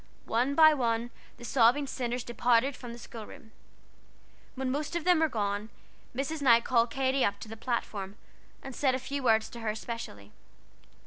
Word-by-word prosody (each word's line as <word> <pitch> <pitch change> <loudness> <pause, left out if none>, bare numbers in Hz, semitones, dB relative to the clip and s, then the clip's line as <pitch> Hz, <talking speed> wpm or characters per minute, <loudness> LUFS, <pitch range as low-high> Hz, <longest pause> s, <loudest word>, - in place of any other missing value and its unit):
One 250 +5 0
by 315 0 +8
one 235 -3 -1 0.3
the 240 - -10
sobbing 245 +4 +4
sinners 245 -2 -3
departed 240 +2 +2
from 245 - -9
the 235 - -8
schoolroom. 230 +1 -11 1.0
When 260 -1 -2
most 295 +4 -3
of 340 - -1
them 360 -1 +4
were 320 -1 +3
gone, 205 -2 -2 0.5
Mrs. 285 +4 -3
Knight 235 -4 +5
called 235 -1 +2
Katy 265 +1 +1
up 200 0 0
to - - -7
the 225 - -8
platform, 215 -4 -3 0.5
and 270 -2 -8
said 265 -3 +2
a - - 0
few 275 +2 -4
words 220 -3 +3
to 235 - -9
her 215 -2 -2
specially. 215 - -7
240 Hz, 175 wpm, -29 LUFS, 225-270 Hz, 1.0 s, by